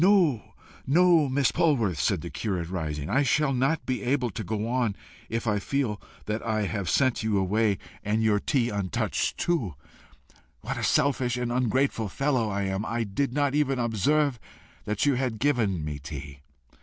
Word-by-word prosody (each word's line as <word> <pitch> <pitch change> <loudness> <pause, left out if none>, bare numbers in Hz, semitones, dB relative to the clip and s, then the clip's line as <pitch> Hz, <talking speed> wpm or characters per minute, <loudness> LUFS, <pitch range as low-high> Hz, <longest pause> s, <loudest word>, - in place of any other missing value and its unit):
"No, 180 - +3 0.3
no, 165 0 +5
Miss 135 0 +2
Polwarth!" 115 - +1
said - - +1
the - - -7
curate, 90 -6 -3
rising; 75 -5 -3
"I 135 - +2
shall 140 +1 +2
not 135 +6 +1
be 130 -1 -2
able 125 -2 0
to 110 - -5
go 110 +2 -2
on 120 -4 0 0.3
if 115 0 -2
I 105 -2 +1
feel 115 -2 -1 0.2
that 105 +1 -2
I 110 -2 0
have 100 -2 -2
sent 130 -3 +2
you 110 -2 +1
away 100 +2 +2 0.3
and 110 +2 0
your 105 -2 +3
tea 120 +1 +1
untouched 100 -3 -1
too! 125 - -1 0.9
What - - -4
a - - -3
selfish 130 -4 +2
and 125 -1 -2
ungrateful 125 -2 +1
fellow 130 -1 0
I 100 0 -1
am! 95 +1 -1
I 115 +1 -1
did 115 +6 -1
not 140 0 +1
even 145 -2 +1
observe 125 +4 +1 0.5
that 105 +4 0
you 145 - +4
had 125 -3 -1
given 110 - +1
me 75 -1 -4
tea! 70 -1 -8
115 Hz, 175 wpm, -27 LUFS, 100-135 Hz, 0.9 s, no